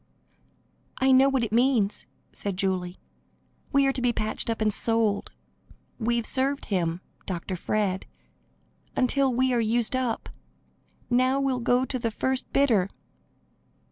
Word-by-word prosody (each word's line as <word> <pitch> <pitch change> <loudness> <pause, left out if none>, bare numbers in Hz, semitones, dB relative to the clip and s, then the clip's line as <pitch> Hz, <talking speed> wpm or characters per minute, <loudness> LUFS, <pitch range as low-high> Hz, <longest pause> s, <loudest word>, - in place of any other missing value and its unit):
"I 265 0 +3
know 265 +1 +6
what 265 -3 +1
it 220 - -2
means," 235 -4 +2 0.2
said 200 -3 -4
Julie. 185 -2 -1 0.7
"We 275 -1 +4
are 270 - +2
to 260 - -3
be 245 -1 +3
patched 215 0 -1
up 225 - -1
and 215 -1 +1
sold. 225 -3 0 0.7
We've 235 0 0
served 275 +3 0
him 175 -3 -1 0.3
(Dr. 185 0 -3
Fred) 195 +1 -1 0.9
until 265 +1 +2
we 255 +1 +1
are 240 - +2
used 230 +2 +1
up; 255 -3 -1 0.8
now 255 +2 +3
we'll 270 -2 0
go 245 +2 +2
to 260 -1 -3
the 230 -1 -1
first 260 +3 -2
bidder." 225 -9 +3
235 Hz, 140 wpm, -26 LUFS, 205-260 Hz, 0.9 s, know